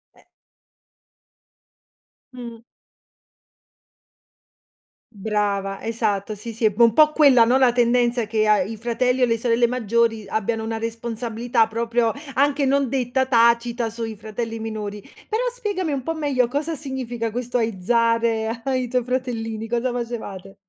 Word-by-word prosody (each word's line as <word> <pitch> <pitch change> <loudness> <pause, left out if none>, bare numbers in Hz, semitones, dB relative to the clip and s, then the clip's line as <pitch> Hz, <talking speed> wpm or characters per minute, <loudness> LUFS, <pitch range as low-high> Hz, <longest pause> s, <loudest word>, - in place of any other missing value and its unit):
E - - -23 2.1
Mh. 235 -2 -9 2.5
Brava, 200 -2 -2
esatto. 215 -2 -2
Sì, 225 +3 -8
sì, 225 +1 -1
è - - +6
bo 230 +2 +4
po' 305 +3 +6
quella, 275 -7 +6
no, 245 +3 +3
la 260 -2 +4
tendenza 240 -1 +2
che 215 0 +1
a 210 -2 +4
i 215 +4 -4
fratelli 250 +3 0
e - - +7
le 230 -1 0
sorelle 235 0 +2
maggiori 230 -2 0
abbiano 220 +2 -2
una 225 0 -3
responsabilità, 230 0 -1
proprio 230 +1 0 0.2
anche 280 +1 +2
non 275 -1 +2
detta, 260 0 0
tacita 235 -1 +2
sui 225 -1 -5
fratelli 225 +2 -5
minori. 210 -2 -5 0.3
Però 440 +2 -1
spiegami 410 -10 -3
un 270 -2 -3
po' 325 - -2
meglio: 280 -6 0
cosa 295 +5 -2
significa 255 -5 -4
questo 245 +2 -2
aizzare 230 +1 0
ai 260 -2 0
tuoi 250 0 0
fratellini, 230 -3 -3
cosa 240 +2 -1
facevate? 230 -6 -6
235 Hz, 135 wpm, -22 LUFS, 225-250 Hz, 2.5 s, e